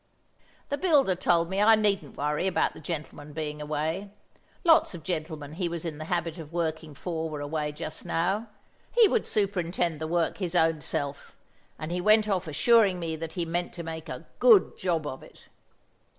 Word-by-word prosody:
The 285 - -2
builder 295 - +4
told 170 -1 +2
me 190 +3 -1
I 220 +1 +7
needn't 205 -2 0
worry 150 +5 0
about 190 - +1
the - - -11
gentleman 150 -2 -6
being 150 -1 -4
away; 155 +6 -2 0.5
lots 325 - +5
of 165 - -9
gentlemen 155 -4 -4
he 170 +2 -2
was 170 0 -4
in 155 -2 -4
the 155 - -5
habit 170 0 -2
of 155 -1 -9
working 160 -3 -3
for 160 +1 -3
were 150 -1 -5
away 150 +1 -2
just 155 +1 -6
now; 195 +7 0 0.4
he 470 -2 +6
would 440 +3 0
superintend 175 -5 0
the 160 - -2
work 170 +2 0
his 180 -2 -3
own 160 -2 +3
self, 140 0 -4 0.4
and 155 +2 -5
he 180 +1 -1
went 215 +2 +5
off 190 -4 0
assuring 190 +5 +4
me 165 -2 -3
that 160 0 -6
he 175 -3 -2
meant 175 +2 -2
to 170 - -6
make 160 0 -6
a - - -7
good 450 -6 +6
job 170 -5 -1
of 130 -2 -5
it. - - -17
170 Hz, 190 wpm, -28 LUFS, 155-190 Hz, 0.5 s, I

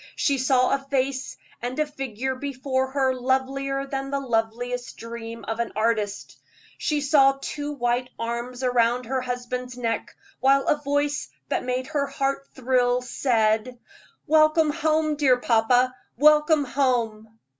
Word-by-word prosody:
She 280 -2 +1
saw 255 -1 +3
a 275 - +2
face 270 -1 -1 0.2
and 245 +2 -4
a 305 - +2
figure 265 -3 -4
before 265 0 -2
her 265 -1 +1
lovelier 270 +2 -1
than 270 0 -4
the 280 0 -1
loveliest 245 0 -2
dream 230 0 -8
of 225 +1 -3
an 235 - -2
artist. 215 -2 -1 0.4
She 300 -1 0
saw 275 -1 +4
two 290 +1 -4
white 245 -1 -1
arms 235 +2 -4
around 245 0 +2
her 260 +2 -1
husband's 250 0 -4
neck, 230 -3 -3 0.2
while 275 +1 +4
a 295 - +1
voice 285 +1 -1 0.2
that - - -1
made 255 0 -1
her 285 -1 -1
heart 275 0 -2
thrill 250 -1 +1
said: 235 -1 +1 0.5
"Welcome 310 0 +4
home, 310 0 +1
dear 265 -4 +4
papa 245 +1 +3 0.2
welcome 300 +1 +5
home!" 230 -5 -1
260 Hz, 140 wpm, -24 LUFS, 245-275 Hz, 0.5 s, welcome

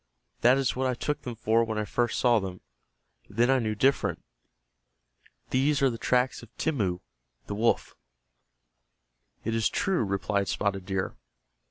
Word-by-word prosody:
"That 125 +3 +5
is 135 -2 0
what 130 +1 0
I 125 - 0
took 150 +4 -2
them 125 -4 -6
for 115 +1 +2
when 110 -1 -3
I 105 - -1
first 120 +2 0
saw 120 -3 +4
them. 95 -2 -6 0.7
Then 120 +3 +2
I 135 - +4
knew 110 -2 -1
different. 135 +6 +1 1.3
These 140 +2 +2
are 135 - +4
the 115 - -6
tracks 125 +1 +1
of 115 - -13
Timmeu, 100 - 0 0.4
the - - -5
wolf." 115 +3 +1 1.5
"It 115 - -1
is 115 -1 +2
true," 190 -9 +1
replied 100 0 -1
Spotted 95 -2 -1
Deer. 95 -1 -2
115 Hz, 155 wpm, -28 LUFS, 105-130 Hz, 1.5 s, That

